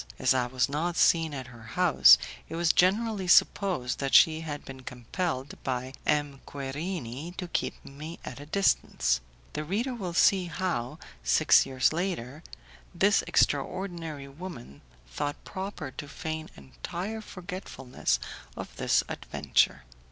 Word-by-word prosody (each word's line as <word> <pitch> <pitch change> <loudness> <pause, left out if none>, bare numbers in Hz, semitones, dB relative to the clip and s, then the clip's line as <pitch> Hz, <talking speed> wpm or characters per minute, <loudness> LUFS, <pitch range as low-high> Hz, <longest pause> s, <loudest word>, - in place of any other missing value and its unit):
As - - +3
I 125 -2 +1
was 130 +1 +1
not 160 +5 -1
seen 165 -2 +4
at 135 -3 -5
her 120 - -13 0.2
house, 165 - +8 0.3
it - - -5
was 170 -1 +3
generally 200 +1 +2
supposed 175 -8 +3
that 135 -1 +1
she 160 0 +6
had 145 -2 -6
been 135 -1 -9
compelled 130 +3 -4
by 130 0 -3
M. 145 -2 0
Querini 145 +2 -5
to 180 - -4
keep - - -3
me 155 +5 -8
at 130 - -7
a 145 - -10
distance. 65 - +2 0.3
The 150 - -3
reader 220 - -1
will 185 -8 -5
see 190 +1 +5
how, 170 -8 -2 0.3
six - - +5
years 130 +2 +2
later, 160 -6 -3 0.5
this - - +4
extraordinary 165 -7 0
woman 140 - -9 0.3
thought 145 - -4
proper 190 -7 -5
to 145 - -8
feign 160 +2 -5
entire 180 - -6
forgetfulness 180 - -3 0.4
of - - -7
this - - +3
adventure. - - 0
155 Hz, 135 wpm, -28 LUFS, 130-180 Hz, 0.5 s, house